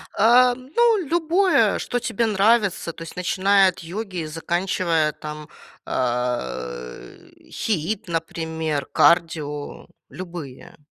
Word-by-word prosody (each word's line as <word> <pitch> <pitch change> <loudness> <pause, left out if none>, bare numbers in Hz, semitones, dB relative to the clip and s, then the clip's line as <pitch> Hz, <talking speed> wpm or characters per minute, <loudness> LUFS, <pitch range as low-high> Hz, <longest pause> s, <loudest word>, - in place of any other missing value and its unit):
А, 245 +3 +5
ну, 435 - +2
любое, 345 +4 +2
что 245 - -2
тебе 230 0 -1
нравится. 205 -4 +2
То 165 - -9
есть, 165 - -10
начиная 190 +2 +3
от 180 - -8
йоги 190 +2 -6
и - - -4
заканчивая, 170 -1 0
там, 150 0 -8 0.4
э, 65 - -4 0.2
HIIT, 205 0 -2
например, 160 -3 -3
кардио, 160 -4 +1 0.2
любые. 170 -8 -9
175 Hz, 105 wpm, -22 LUFS, 155-220 Hz, 0.4 s, А